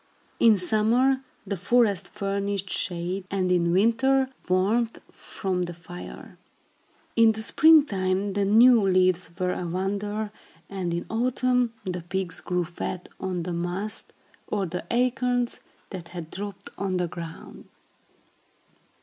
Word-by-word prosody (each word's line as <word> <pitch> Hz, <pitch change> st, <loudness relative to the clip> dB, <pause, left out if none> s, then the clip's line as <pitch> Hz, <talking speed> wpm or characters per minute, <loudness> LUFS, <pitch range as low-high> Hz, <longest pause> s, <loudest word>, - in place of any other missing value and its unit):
In 225 Hz, -3 st, +6 dB
summer, 230 Hz, +8 st, +3 dB, 0.2 s
the 200 Hz, -, -2 dB
forest 205 Hz, +1 st, +2 dB
furnished 200 Hz, -1 st, -2 dB
shade, 180 Hz, +2 st, -1 dB
and 185 Hz, -2 st, 0 dB
in 170 Hz, -1 st, +2 dB
winter 255 Hz, +7 st, +3 dB, 0.2 s
warmth 215 Hz, +6 st, +2 dB
from 190 Hz, -3 st, -4 dB
the 175 Hz, -1 st, -3 dB
fire. 175 Hz, +1 st, -10 dB, 0.8 s
In 225 Hz, -1 st, +6 dB
the 220 Hz, 0 st, -5 dB
spring 315 Hz, +5 st, +6 dB
time, 190 Hz, -3 st, -1 dB
the 200 Hz, 0 st, +1 dB
new 230 Hz, +4 st, +6 dB
leaves 185 Hz, -2 st, +2 dB
were 180 Hz, -1 st, 0 dB
a 175 Hz, -, -4 dB
wonder, 205 Hz, +4 st, -2 dB, 0.4 s
and 185 Hz, -3 st, -3 dB
in 170 Hz, +1 st, -2 dB
autumn 250 Hz, 0 st, +1 dB
the 180 Hz, -1 st, -3 dB
pigs 180 Hz, 0 st, -2 dB
grew 180 Hz, -1 st, -1 dB
fat 175 Hz, +1 st, -5 dB
on 185 Hz, -2 st, -3 dB
the 180 Hz, +1 st, -4 dB
mast, 175 Hz, +5 st, -3 dB, 0.4 s
or 200 Hz, -2 st, -1 dB
the 180 Hz, +1 st, -5 dB
acorns, 245 Hz, 0 st, +1 dB, 0.3 s
that 180 Hz, -3 st, -7 dB
had 170 Hz, -2 st, -8 dB
dropped 200 Hz, 0 st, -7 dB
on 190 Hz, -1 st, -1 dB
the 180 Hz, -1 st, 0 dB
ground. 165 Hz, -1 st, -9 dB
195 Hz, 130 wpm, -26 LUFS, 180-225 Hz, 0.8 s, In